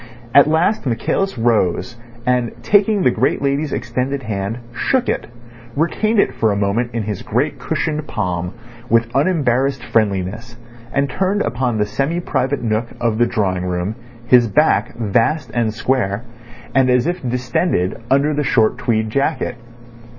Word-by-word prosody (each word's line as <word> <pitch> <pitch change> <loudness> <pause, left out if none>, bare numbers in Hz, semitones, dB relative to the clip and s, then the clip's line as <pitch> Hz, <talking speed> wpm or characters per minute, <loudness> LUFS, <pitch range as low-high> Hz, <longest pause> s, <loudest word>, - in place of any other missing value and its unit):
At 140 +1 +7
last 160 +2 +1
Michaelis 160 +11 -1
rose, 115 -1 +1 0.3
and 125 -2 +1
taking 205 -1 +3
the 125 - +4
great 125 +4 +1
lady's 140 +2 0
extended 130 +3 -2
hand, 100 0 -3 0.2
shook 250 - 0
it, - - -1 0.5
retained 215 +9 +1
it - - +2
for 110 -1 +1
a - - 0
moment 100 +4 0
in 115 - -1
his 105 -2 -4
great - - -1
cushioned 155 -1 -2
palm 90 -2 -3 0.3
with 115 0 +2
unembarrassed 135 -5 +1
friendliness, 110 +3 -1 0.3
and 140 +1 +1
turned 190 +8 0
upon 120 0 -1
the 105 - +2
semi 140 +11 -1
private 135 -5 -1
nook 110 +1 0
of 115 -2 0
the 120 - +4
drawing 95 -5 -1
room 90 +3 -2 0.3
his 120 -1 +5
back, 120 -3 +2
vast 120 +6 0
and 115 -2 +1
square, 110 -2 -1 0.5
and 130 -1 +4
as 125 0 +3
if 175 +2 -2
distended 125 - -1
under 140 +3 +3
the 150 0 0
short 110 -5 +2
tweed 110 -3 0
jacket. 140 0 0
120 Hz, 150 wpm, -19 LUFS, 110-140 Hz, 0.5 s, At